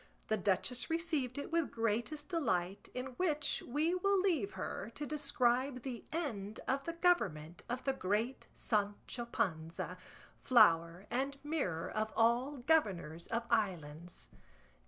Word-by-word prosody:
The 220 - +3
duchess 210 +6 +1
received 320 -7 0
it 285 - -4
with 335 -2 +2
greatest 235 +7 -1
delight, 195 - 0
in 255 +1 -4
which 305 -5 +1
we 300 +7 +1
will 395 +2 +3
leave 325 - +1
her, 190 +3 -4
to 295 - -3
describe 260 -3 +1
the 250 -4 -5
end 220 -11 -3
of 275 +1 0
the 335 - -2
government 180 - +1
of 245 +1 -2
the 270 - +1
great 220 +3 -1
Sancho 210 +2 -1
Panza, 170 -4 -2 0.4
flower 175 -6 +5
and 275 +3 -1
mirror 275 - -1
of 215 0 -1
all 240 +5 +3
governors 185 - +2
of 230 +1 -1
islands. 170 -5 -1
240 Hz, 135 wpm, -35 LUFS, 195-295 Hz, 0.4 s, flower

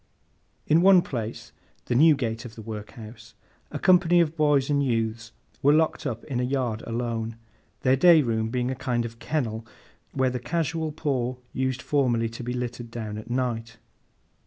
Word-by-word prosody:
In 160 +2 +4
one 185 -1 +6
place, 115 -1 -5 0.3
the - - -1
Newgate 125 -5 +3
of 115 -3 -10
the 110 - -9
Workhouse, 110 +1 -9 0.3
a - - -5
company 175 -1 +4
of 165 -2 +1
boys 145 -4 +3
and 145 -1 +1
youths 115 -2 -1 0.3
were 145 +2 +5
locked 160 -2 +1
up 115 -4 -4
in 130 -4 -3
a - - 0
yard 125 -4 -1
alone; 115 -1 -3 0.5
their 130 0 +4
day 160 +2 +6
room 110 -2 -1
being 125 +1 -1
a - - -3
kind 120 -2 -1
of 115 0 -8
kennel 115 -8 -2 0.5
where 130 -1 +1
the 125 - -3
casual 160 +3 -2
poor 130 -5 -2 0.2
used 130 -1 -2
formerly 120 -6 +1
to 115 +2 -8
be 120 0 -3
littered 125 -1 -5
down 110 -2 -5
at 110 - -11
night. 115 -2 -2
125 Hz, 170 wpm, -25 LUFS, 115-145 Hz, 0.5 s, one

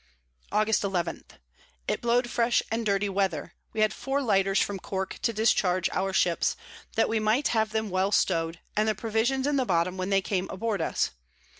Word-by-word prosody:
Aug. 215 0 +2
11. 180 -4 -2 0.6
It - - -1
blow'd 240 +1 +2
fresh 235 0 +2
and 225 +1 0
dirty 200 0 +1
Weather; 190 -6 -1 0.2
we 220 - -2
had 215 0 +3
four 270 +1 -2
Lighters 195 -6 +2
from 200 -1 -1
Cork 190 +1 -4
to 230 - +1
discharge 195 -5 +2
our 190 +1 -1
Ships, 175 -2 +2 0.4
that 225 - +3
we 225 0 0
might 215 +6 +2
have 220 -2 +1
them 220 -2 -2
well 190 +2 +1
stow'd, 165 -4 +1 0.2
and 215 +1 +2
the 215 - 0
Provisions 225 +5 0
in 290 -1 +1
the 265 - +2
bottom 180 -1 +1
when 185 +1 -2
they 195 -1 +3
came 190 -1 -1
aboard 205 -1 -2
us. - - 0
205 Hz, 185 wpm, -27 LUFS, 190-225 Hz, 0.6 s, had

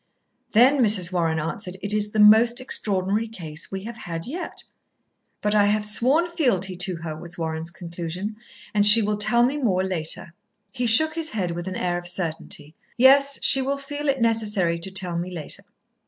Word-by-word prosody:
"Then," 255 +6 +5
Mrs. 195 -5 +5
Warren 165 -3 0
answered, 180 +4 -5
"it 205 +1 -1
is 210 0 +1
the 215 - -2
most 220 +3 +5
Extraordinary 205 -3 -1
Case 165 -7 -7
we 190 0 -6
have 235 +2 -8
had 165 -5 -7
yet." 340 +8 -7 0.8
"But 210 0 0
I 205 -1 +3
have 210 0 +1
sworn 260 +11 +1
fealty 240 - -1
to 180 0 -1
her," 155 -2 -5
was 170 +2 -7
Warren's 160 0 -4
conclusion. 175 +4 -7 0.4
"And 205 -1 +2
she 210 +2 +9
will 210 0 -1
tell 220 +3 +2
me 265 +4 0
more 195 -10 0
later." 170 -1 -2 0.4
He 250 -2 -2
shook 315 +8 +5
his 325 -1 -3
head 185 -5 -3
with 175 +2 -6
an 185 - -5
air 175 -1 -2
of 175 - -9
certainty. 160 -4 -5 0.2
"Yes, 275 +2 +5
she 270 - +5
will 275 +2 -2
feel 290 +1 -5
it 270 -1 0
necessary 210 -7 0
to 170 - -3
tell 180 -3 -3
me 175 +2 -5
later." 170 -4 -5
205 Hz, 185 wpm, -23 LUFS, 175-235 Hz, 0.8 s, she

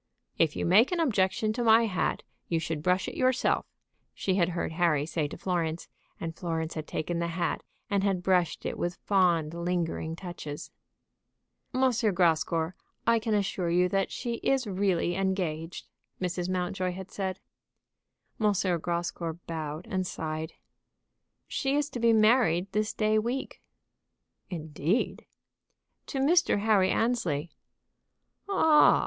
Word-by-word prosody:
"If 160 -2 +3
you - - -1
make 210 - +5
objection 220 - +1
to 240 +2 -2
my 225 0 +6
hat, 185 -5 -1 0.2
you 165 - +1
should 160 -1 -3
brush 180 +3 +1
it - - -5
yourself," 255 0 +1 0.5
she 190 - 0
had 180 -2 +2
heard - - -1
Harry 160 -4 +2
say 155 -1 -1
to - - -8
Florence, 170 -3 -2 0.3
and 165 -1 -4
Florence 165 -2 -3
had 155 -1 -5
taken 170 +2 -2
the 170 - 0
hat, 170 +1 -1 0.3
and 200 -3 +1
had 195 -3 0
brushed 180 -3 +1
it - - -3
with 175 0 -1
fond, 175 -6 +2
lingering 170 -2 -2
touches. 170 -5 -7 1.0
"M. 255 - -1 0.3
Grascour, 165 -1 +2 0.3
I 230 0 +4
can 220 -1 0
assure 195 -3 0
you 180 +1 +3
that 195 +1 +1
she 235 -1 -3
is 265 +1 +1
really 190 -3 +1
engaged," 180 -3 -2 0.3
Mrs. 180 0 -2
Mountjoy 185 0 -1
had 190 +1 -8
said. 190 -1 -3 1.0
M. 210 -2 +3 0.3
Grascour 170 0 -2
bowed 155 0 -5
and 185 -2 -1
sighed. 155 0 -4 0.9
"She 270 0 0
is 295 0 0
to 245 - -4
be 235 0 +4
married 215 -5 +4
this 210 +1 0
day 215 -1 +2
week." 240 +5 -3 0.9
"Indeed!" 160 - -2 0.8
"To 275 - -4
Mr. 295 - +3
Harry 205 -3 +4
Annesley." 175 -11 0 1.0
"Oh 395 - -1
h 310 -2 +7
h! - - +1
185 Hz, 140 wpm, -29 LUFS, 165-215 Hz, 1.0 s, h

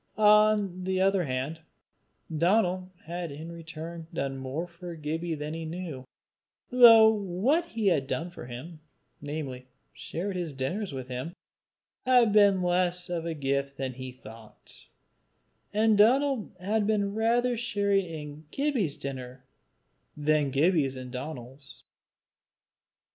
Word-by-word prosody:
On 210 -3 +4
the 190 0 0
other 190 -2 +3
hand, 135 +4 -3 0.8
Donal 185 +2 +2
had 170 0 -5
in 155 +4 -8
return 165 0 -8
done 135 -4 -3
more 135 +6 -3
for 175 0 -9
Gibbie 160 +2 -3
than 150 +1 -5
he 165 0 -5
knew, 160 -5 -6 0.7
though 230 -3 +9
what 215 - 0
he 225 -8 -4
had 155 -8 +2
done 170 +5 -3
for 145 - -10
him, 155 +7 -8 0.4
namely, 140 -4 -5 0.3
shared 190 +3 -5
his 170 -5 -4
dinners 180 +10 -3
with 130 -2 -6
him, 130 +7 -5 0.7
had 245 -4 +4
been 200 -3 +5
less 180 0 0
of 170 -1 -2
a 165 - -3
gift 140 -1 -1
than 130 -1 -3
he 130 0 -7
thought, 115 -3 -14 0.8
and 215 0 +3
Donal 260 +2 +3
had 210 +3 0
rather 220 +4 +1
been 240 - -1
sharing 200 -5 +1
in 150 -1 -8
Gibbie's 260 - -1
dinner, 130 -1 -7 0.7
than 150 -1 +2
Gibbie 150 +2 +3
in 130 -1 -8
Donal's. 135 0 -8
170 Hz, 130 wpm, -28 LUFS, 140-205 Hz, 0.8 s, though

